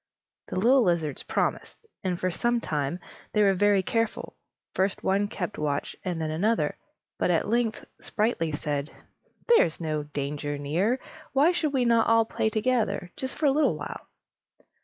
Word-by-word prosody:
The - - -6
little 245 +8 +5
lizards 170 - 0
promised; - - -2 0.3
and 180 -2 -1
for 185 - 0
some 240 +7 +1
time 150 -3 -2 0.3
they 210 - +4
were 195 -1 +5
very 200 0 +3
careful; 225 +2 -2 0.4
first 190 +1 0
one 200 +2 +2
kept 210 - -5
watch, 145 -2 -2
and 175 -3 -2
then 155 -1 -2
another; 165 -2 +1 0.4
but - - +1
at 170 -2 +2
length 230 0 0
Sprightly 210 -8 -1
said: 145 0 -2 0.6
"There 475 - +7
is 165 - -6
no 155 -2 -1
danger 145 0 -4
near. 175 - 0 0.3
Why 285 +6 +5
should 320 -5 -1
we 255 -2 +2
not 230 -1 +4
all 230 0 +5
play 220 - -1
together, 220 -5 0
just 260 0 -4
for 305 - -1
a 280 - +6
little 300 +3 +2
while?" - - -7
195 Hz, 165 wpm, -27 LUFS, 155-235 Hz, 0.6 s, There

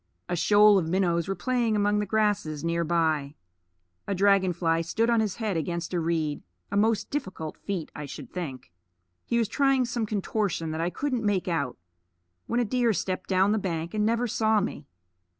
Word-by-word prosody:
A 175 - -1
shoal 205 +4 +6
of 165 - -2
minnows 170 -2 +1
were 195 - -1
playing 235 +3 0
among 205 0 +2
the 210 - -2
grasses 205 -8 0
near 170 0 0
by. 155 -4 0 0.7
A 200 - -1
dragon 195 -1 +4
fly 165 -1 +1
stood 225 +8 0
on 230 - +3
his 210 -4 0
head 215 -5 -2
against 170 +2 -3
a 175 - +1
reed 160 -3 -1 0.3
a - - -2
most 215 +1 +1
difficult 185 - -4
feat, 190 -6 -5
I 150 -1 -6
should - - -9
think. 135 - -6 0.6
He 235 - +1
was 230 -2 +2
trying 270 0 +2
some 235 -2 -2
contortion 200 -5 -1
that 160 +1 -3
I 170 - 0
couldn't 255 +3 -2
make 200 -4 0
out, 145 -8 -1 0.7
when 240 - 0
a 240 - +2
deer 240 0 +2
stepped 185 -1 -3
down 190 +1 +3
the 215 - +2
bank 170 -3 -3
and 210 -1 0
never 230 +3 +1
saw 220 -1 +2
me. 170 -7 -4
195 Hz, 190 wpm, -27 LUFS, 165-220 Hz, 0.7 s, shoal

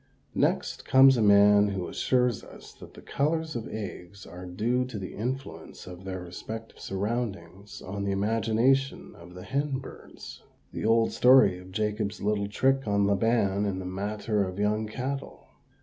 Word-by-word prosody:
Next - - 0
comes 135 0 +6
a 120 - 0
man 105 0 +6
who 95 -3 -3
assures 125 -4 0
us - - -13
that - - -13
the - - -13
colors 160 +2 -1
of 115 -2 -4
eggs 100 -2 -8
are 90 +2 -10
due 115 +8 0
to 125 -4 -7
the 95 -2 -6
influence 130 +5 -6
of 90 +1 -10
their 95 -1 -5
respective 110 +6 -8
surroundings 100 -2 -4
on 100 +1 -5
the 100 - -1
imagination 115 +6 +1
of 90 +1 -14
the 90 - -9
hen 140 +4 -1
birds 130 - -11 0.3
the - - -4
old 115 0 +3
story 125 -7 +5
of 90 0 -13
Jacob's 105 0 -2
little 100 0 0
trick 135 +4 +1
on 100 0 +2
Laban 100 0 +1
in 95 -2 -2
the 95 - -6
matter 105 +3 -2
of 95 -1 -5
young 105 +1 0
cattle. 135 +5 -5
105 Hz, 165 wpm, -27 LUFS, 95-120 Hz, 0.3 s, comes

